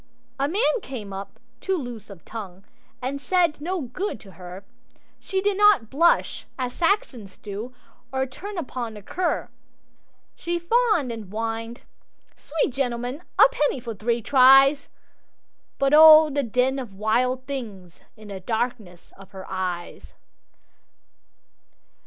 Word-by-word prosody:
A 275 - +1
man 420 +7 +1
came 215 - -7
up, 195 +1 -8 0.2
too 385 -1 -1
loose 240 - -7
of 195 -4 -13
tongue, 195 -4 -8 0.4
And 275 +2 -3
said 340 -3 +1
no 360 +3 -2
good 265 - -4
to 195 - -14
her; 180 +2 -11 0.5
She 385 -1 -2
did 405 0 0
not 415 - +4
blush 335 +5 +2
as 250 -2 -3
Saxons 265 - -1
do, 215 +5 -7 0.4
Or 265 0 0
turn 385 +10 -9
upon 250 -8 -5
the 210 - -11
cur; 360 - -2 0.8
She 345 0 -3
fawned 355 - +1
and 220 -4 -7
whined 225 +2 -4 0.5
"Sweet 295 -1 -2
gentleman, 250 +2 -3 0.2
A - - +8
penny 295 - 0
for 235 -2 -6
three 230 +2 -2
tries!" 270 +2 +6 0.9
But 275 +1 +1
oh, 310 0 +9
the 285 +1 0
den 255 +2 0
of 230 -7 -8
wild 250 +5 0
things 210 -11 -7 0.2
in 215 -1 -13
The 195 -1 -6
darkness 220 -3 -4
of 195 -1 -15
her 190 -1 -9
eyes! 180 -2 -5
250 Hz, 135 wpm, -24 LUFS, 215-300 Hz, 0.9 s, oh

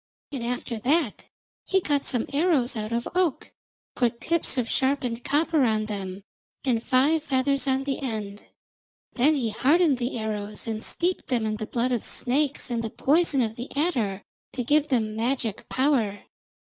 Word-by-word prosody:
And 265 -4 -4
after 240 -1 -3
that 280 0 0 0.4
he 380 - +2
cut 290 -6 0
some 245 -3 +1
arrows 285 -5 +2
out 215 0 -4
of 235 +1 -1
oak, 355 -6 0 0.4
put 235 -2 0
tips 335 -1 +2
of 245 -2 0
sharpened 255 -3 0
copper 300 +1 +2
on 215 -3 +1
them, 195 -2 -5 0.4
and 240 -4 +1
five 285 +6 +3
feathers 275 -1 0
on 265 0 +1
the 275 -1 -2
end. 215 -6 -4 0.7
Then 285 +5 +3
he 245 -5 0
hardened 295 +2 +3
the 245 0 -2
arrows 210 -1 -4
and 220 -1 -3
steeped 360 +1 -1
them 240 -4 0
in 215 0 -1
the 215 -1 -5
blood 245 +1 0
of 240 -3 0
snakes 275 +1 0
and 230 -1 -1
the 225 - -2
poison 290 +1 +2
of 220 -1 -3
the 245 +2 -6
adder 235 - 0 0.3
to 250 - -2
give 295 +4 +3
them 220 -6 0
magic 230 -2 -2
power. 255 -7 +1
250 Hz, 170 wpm, -26 LUFS, 225-285 Hz, 0.7 s, five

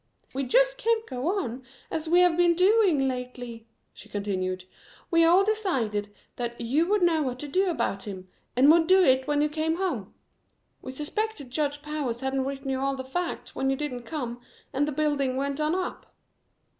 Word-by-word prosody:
"We 270 +1 -2
just - - +3
can't 455 -2 +1
go 255 +2 -4
on 250 - -3 0.3
as 320 0 -3
we 350 +2 +6
have 355 -2 +4
been 345 0 +4
doing 365 -7 +4
lately," 245 -3 -6 0.3
she 215 - -14
continued. 185 -3 -2 0.5
"We 335 -1 +5
all 350 +4 +6
decided 260 - -1 0.3
that 240 -1 -4
you 280 +9 +1
would 410 -1 +2
know 330 -3 +3
what 255 -4 -2
to 295 - -6
do 370 +6 +1
about 200 - -2
him, 190 -2 -7 0.3
and 270 +4 +7
would 325 0 +4
do 375 +1 +6
it 260 -3 +3
when 295 0 +2
you - - +3
came 315 +2 -1
home. 335 - -3 0.7
We - - -7
suspected 300 - -4
Judge 290 +1 -1
Powers 290 -6 -3
hadn't 265 0 -1
written 275 0 -4
you 260 - -1
all 275 0 0
the 260 - -5
facts 345 +7 -4
when 270 - -1
you 270 - +2
didn't 265 -3 -4
come 245 -5 -4 0.3
and 285 +2 +1
the - - -1
building 280 -3 0
went 280 +2 -2
on 305 +3 +1
up. 370 -1 -4
285 Hz, 190 wpm, -27 LUFS, 250-340 Hz, 0.7 s, and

